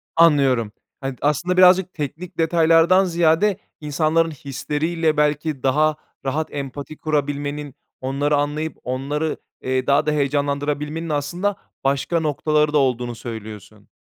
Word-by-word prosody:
Anlıyorum, 140 Hz, -9 st, +4 dB, 0.3 s
hani, 135 Hz, -1 st, -3 dB
aslında 160 Hz, +6 st, +1 dB
birazcık 185 Hz, 0 st, +6 dB
teknik 155 Hz, +4 st, -6 dB
detaylardan 165 Hz, +3 st, +4 dB
ziyade 175 Hz, +3 st, +2 dB, 0.2 s
insanların 155 Hz, +2 st, +1 dB
hisleriyle, 155 Hz, +3 st, -2 dB
belki, 150 Hz, -1 st, 0 dB
daha 150 Hz, +3 st, +3 dB, 0.3 s
rahat 150 Hz, +4 st, -2 dB
empati 140 Hz, +1 st, -6 dB
kurabilmenin, 145 Hz, -1 st, -2 dB, 0.3 s
onları 140 Hz, +3 st, 0 dB
anlayıp 150 Hz, +2 st, -2 dB
onları, 145 Hz, +5 st, -2 dB, 0.2 s
eee, 130 Hz, 0 st, -1 dB
daha 140 Hz, +2 st, +3 dB
da 150 Hz, -, +1 dB
heyecanlandırabilmenin 145 Hz, +2 st, -1 dB
aslında 175 Hz, +7 st, -1 dB, 0.3 s
başka 140 Hz, +5 st, +1 dB
noktaları 150 Hz, 0 st, +1 dB
da -, -, +4 dB
olduğunu 125 Hz, -3 st, 0 dB
söylüyorsun. 110 Hz, -3 st, -9 dB
150 Hz, 115 wpm, -21 LUFS, 140-160 Hz, 0.3 s, birazcık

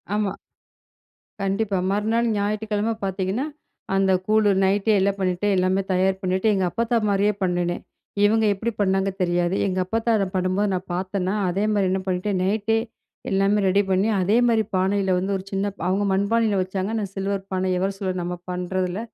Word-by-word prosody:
ஆமா. 210 Hz, -2 st, -1 dB, 1.0 s
கண்டிப்பா. 195 Hz, +1 st, 0 dB
மறுநாள் 220 Hz, +3 st, +1 dB
ஞாயிற்றுக்கிழம 210 Hz, +1 st, -1 dB
பாத்தீங்கன்னா, 195 Hz, +6 st, -1 dB, 0.5 s
அந்த 195 Hz, 0 st, +3 dB, 0.2 s
கூழு 215 Hz, -1 st, +4 dB
நைட்டே 200 Hz, +3 st, +2 dB
எல்லாம் 200 Hz, +1 st, +1 dB
பண்ணிட்டு, 185 Hz, +1 st, 0 dB
எல்லாமே 185 Hz, +1 st, +2 dB
தயார் 190 Hz, +1 st, +1 dB
பண்ணிட்டு 185 Hz, +3 st, 0 dB
எங்க 190 Hz, -2 st, +1 dB
அப்பத்தா 230 Hz, +4 st, 0 dB
மாரியே 200 Hz, +1 st, +2 dB
பண்ணுனேன். 175 Hz, -1 st, -1 dB, 0.4 s
இவுங்க 220 Hz, +1 st, +3 dB
எப்டி 220 Hz, +4 st, -3 dB
பண்ணாங்க 195 Hz, 0 st, +2 dB
தெரியாது, 175 Hz, 0 st, +1 dB
எங்க 185 Hz, -1 st, -1 dB
அப்பத்தா 225 Hz, +4 st, 0 dB
அத 200 Hz, -, +1 dB
பண்ணும்போது 185 Hz, +2 st, +1 dB
நான் 185 Hz, 0 st, -3 dB
பாத்தேனா, 185 Hz, +1 st, -2 dB, 0.2 s
அதே 195 Hz, +4 st, -1 dB
மாரி 200 Hz, -3 st, +2 dB
என்ன 190 Hz, -, 0 dB
பண்ணிட்டேன், 185 Hz, +1 st, -1 dB
நைட்டே 215 Hz, +3 st, +1 dB, 0.5 s
எல்லாமே 195 Hz, +2 st, +2 dB
ரெடி 195 Hz, +2 st, +4 dB
பண்ணி, 190 Hz, +3 st, +2 dB
அதே 200 Hz, +5 st, +3 dB
மாரி 225 Hz, -2 st, +3 dB
பானையில 190 Hz, 0 st, +1 dB
வந்து 195 Hz, +2 st, -1 dB
ஒரு 190 Hz, -, -8 dB
சின்னபா 200 Hz, 0 st, -3 dB
அவுங்க 195 Hz, +2 st, +1 dB
மண்பானையில 205 Hz, +1 st, +1 dB
வச்சாங்க. 190 Hz, +2 st, -3 dB
நான் 200 Hz, -3 st, -4 dB
சில்வர் 195 Hz, 0 st, -3 dB
பானை 185 Hz, 0 st, 0 dB
எவர் 195 Hz, +1 st, -1 dB
சில்வர் 185 Hz, -2 st, -2 dB
நம்ம 175 Hz, +1 st, -4 dB
பண்றதுல, 180 Hz, +1 st, -2 dB
195 Hz, 160 wpm, -23 LUFS, 185-205 Hz, 1.0 s, கூழு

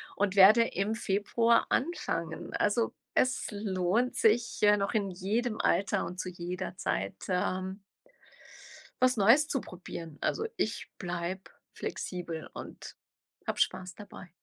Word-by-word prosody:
und 200 Hz, -1 st, 0 dB
werde 205 Hz, +5 st, +8 dB
im 205 Hz, +4 st, -1 dB
Februar 230 Hz, +3 st, +2 dB
anfangen. 255 Hz, -, -2 dB
Also, 215 Hz, +3 st, +1 dB, 0.2 s
es 255 Hz, 0 st, +2 dB
lohnt 200 Hz, +3 st, 0 dB
sich, 230 Hz, +2 st, +2 dB
äh, 210 Hz, 0 st, +7 dB
noch 200 Hz, 0 st, -1 dB
in 200 Hz, -3 st, +1 dB
jedem 215 Hz, +5 st, -1 dB
Alter 195 Hz, +2 st, +2 dB
und 180 Hz, +2 st, -7 dB
zu 185 Hz, -, -3 dB
jeder 180 Hz, +1 st, -5 dB
Zeit, 95 Hz, -, -2 dB
ähm 185 Hz, +1 st, -1 dB, 1.2 s
was 255 Hz, 0 st, +4 dB
Neues 235 Hz, +9 st, +6 dB
zu 270 Hz, -4 st, -1 dB
probieren. 170 Hz, -3 st, -8 dB
Also, 440 Hz, -, 0 dB
ich -, -, -2 dB
bleibe 175 Hz, +1 st, -4 dB, 0.2 s
flexibel 170 Hz, -3 st, -5 dB
und -, -, -9 dB, 0.5 s
habe -, -, -2 dB
Spaß 185 Hz, -1 st, 0 dB
dabei. 205 Hz, -3 st, -11 dB
195 Hz, 130 wpm, -30 LUFS, 180-225 Hz, 1.2 s, werde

